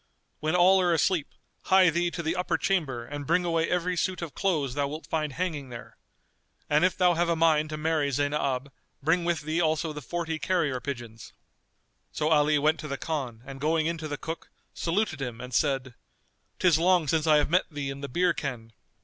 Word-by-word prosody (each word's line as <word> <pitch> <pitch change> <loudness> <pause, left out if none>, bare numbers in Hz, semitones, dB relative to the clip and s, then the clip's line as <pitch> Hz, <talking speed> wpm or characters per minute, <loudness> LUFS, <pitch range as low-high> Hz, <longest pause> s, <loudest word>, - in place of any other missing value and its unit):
When 155 +3 0
all 185 +2 +6
are 175 -1 +2
asleep, 165 -1 +1 0.4
hie 185 -3 +5
thee 175 +1 +1
to 170 0 -5
the 160 +2 -1
upper 180 0 0
chamber 140 -11 -1
and 145 +1 -7
bring 180 - +2
away 165 -1 +1
every 180 0 0
suit 175 +1 -1
of 160 - -6
clothes 155 -10 0
thou 140 0 0
wilt 155 +3 -7
find 155 -3 -2
hanging 155 -5 -3
there. 120 -1 -10 0.7
And 150 +3 +3
if 185 - +2
thou 180 -1 +4
have 170 +1 +1
a 170 - +2
mind 155 -2 +3
to 155 - -4
marry 155 -2 0
Zaynab, 140 -1 -1 0.3
bring 170 +3 +2
with 170 -2 0
thee 155 +3 -1
also 160 0 0
the 150 - -7
forty 165 0 -3
carrier 150 -4 0
pigeons." 120 -5 -7 0.8
So 150 - -1
Ali 150 -1 +4
went 155 +2 +2
to 150 - -6
the 140 -1 -3
Khan 130 -8 -4
and 135 0 -9
going 155 +1 +1
in 165 0 -1
to 155 - -5
the 145 -1 -4
cook, 165 +1 -6 0.2
saluted 170 -3 -1
him 120 -4 -4
and 125 0 -8
said, 135 -1 0 0.6
"'Tis 175 -4 +4
long 175 -2 +3
since 160 +2 +1
I 155 -1 +6
have 150 +1 +1
met 180 +2 +2
thee 145 -3 -4
in 135 0 -8
the 140 - -5
beer 175 +6 +2
ken." 115 -5 -5
155 Hz, 210 wpm, -27 LUFS, 140-170 Hz, 0.8 s, all